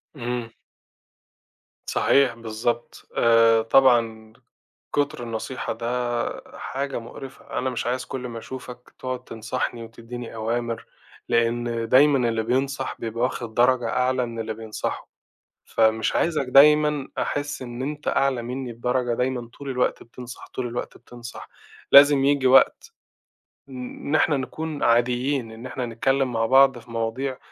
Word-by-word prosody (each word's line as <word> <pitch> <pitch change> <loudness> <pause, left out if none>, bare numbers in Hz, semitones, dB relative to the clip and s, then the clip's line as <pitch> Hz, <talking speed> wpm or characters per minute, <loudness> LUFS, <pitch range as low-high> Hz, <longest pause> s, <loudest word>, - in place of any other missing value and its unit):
إمم. 120 -3 -4 1.4
صحيح، 135 -4 +3
بالضبط. 115 +1 -4
آآ، 115 -1 +5
طبعًا، 115 -3 +3 0.6
كتر 145 -4 0
النصيحة 115 +2 -4
ده 115 +1 -5 0.7
حاجة 135 -1 -4
مقرفة. 130 +3 -9
أنا 130 - -1
مش 125 -2 -3
عايز 125 +1 -1
كل 125 -1 -5
ما 115 -1 -6
أشوفك 125 0 -10
تقعد 130 -1 -4
تنصحني 115 +1 -4
وتدِّيني 115 +1 -9
أوامر، 115 +1 -2 0.4
لأن 115 0 0
دايمًا 135 -2 +5
اللي 115 -1 -1
بينصح 135 +3 -1
بيبقى 115 +1 -3
واخد 120 -3 -2
درجة 120 -1 +3
أعلى 125 +1 +1
من 115 -1 -7
اللي 110 0 -3
بينصحه. 110 -1 -5 0.6
فمش 110 0 +1
عايزك 155 -4 +1
دايمًا 150 0 +5
أحِس 145 -1 -2
إن 120 0 -6
أنت 145 +2 -5
أعلى 135 -3 +1
مني 125 0 -5
بدرجة، 125 +1 -1
دايمًا 125 -1 -2
طول 140 -1 -6
الوقت 125 -1 0
بتنصح، 120 +1 -10
طول 125 -1 -4
الوقت 120 +1 -5
بتنصح. 120 -1 -11 0.4
لازم 140 -1 +8
ييجي 140 -2 +3
وقت 130 +1 +4 0.7
ن 130 - -10 0.3
إن 145 - +1
إحنا 150 -2 +3
نكون 155 +3 -4
عاديين، 120 +1 +1
إن 115 +2 -10
إحنا 130 -1 -4
نتكلَّم 135 +3 0
مع 115 -1 0
بعض 135 +2 +5
في 115 +1 -15
مواضيع 120 +4 -2
125 Hz, 135 wpm, -24 LUFS, 115-135 Hz, 1.4 s, لازم